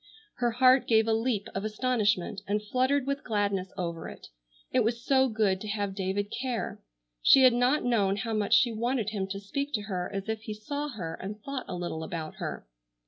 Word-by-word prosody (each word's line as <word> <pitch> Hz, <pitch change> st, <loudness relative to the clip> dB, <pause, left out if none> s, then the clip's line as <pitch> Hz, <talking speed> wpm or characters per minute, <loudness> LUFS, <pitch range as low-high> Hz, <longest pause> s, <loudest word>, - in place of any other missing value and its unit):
Her 240 Hz, -1 st, +2 dB
heart 255 Hz, +2 st, +5 dB
gave 220 Hz, -1 st, +4 dB
a 225 Hz, -, +3 dB
leap 225 Hz, -2 st, 0 dB
of 195 Hz, -, -3 dB
astonishment 215 Hz, -4 st, 0 dB
and 205 Hz, +1 st, +1 dB
fluttered 255 Hz, +5 st, +1 dB
with 280 Hz, 0 st, -2 dB
gladness 200 Hz, -4 st, -1 dB
over 170 Hz, -3 st, -4 dB
it. -, -, -12 dB, 0.4 s
It -, -, +3 dB
was 235 Hz, +2 st, -1 dB
so 265 Hz, -1 st, +4 dB
good 210 Hz, -4 st, +1 dB
to 215 Hz, -, -6 dB
have 205 Hz, -2 st, -2 dB
David 195 Hz, +1 st, -2 dB
care. 250 Hz, -3 st, -3 dB, 0.4 s
She 265 Hz, -, +7 dB
had 255 Hz, -2 st, +7 dB
not 250 Hz, +5 st, +2 dB
known 205 Hz, -5 st, +2 dB
how 220 Hz, +3 st, -3 dB
much 210 Hz, -2 st, +3 dB
she 245 Hz, -3 st, +4 dB
wanted 230 Hz, -1 st, -1 dB
him 195 Hz, -3 st, -2 dB
to 195 Hz, +1 st, -4 dB
speak 280 Hz, +8 st, -4 dB
to 210 Hz, -, 0 dB
her 185 Hz, -3 st, -3 dB
as 195 Hz, 0 st, -4 dB
if 220 Hz, -1 st, -2 dB
he 215 Hz, -1 st, -6 dB
saw 285 Hz, +8 st, -4 dB
her 180 Hz, -, -5 dB
and 210 Hz, +3 st, -6 dB
thought 275 Hz, -2 st, -4 dB
a -, -, -4 dB
little 175 Hz, -2 st, -4 dB
about 160 Hz, -1 st, -5 dB
her. -, -, -5 dB
215 Hz, 205 wpm, -29 LUFS, 195-250 Hz, 0.4 s, She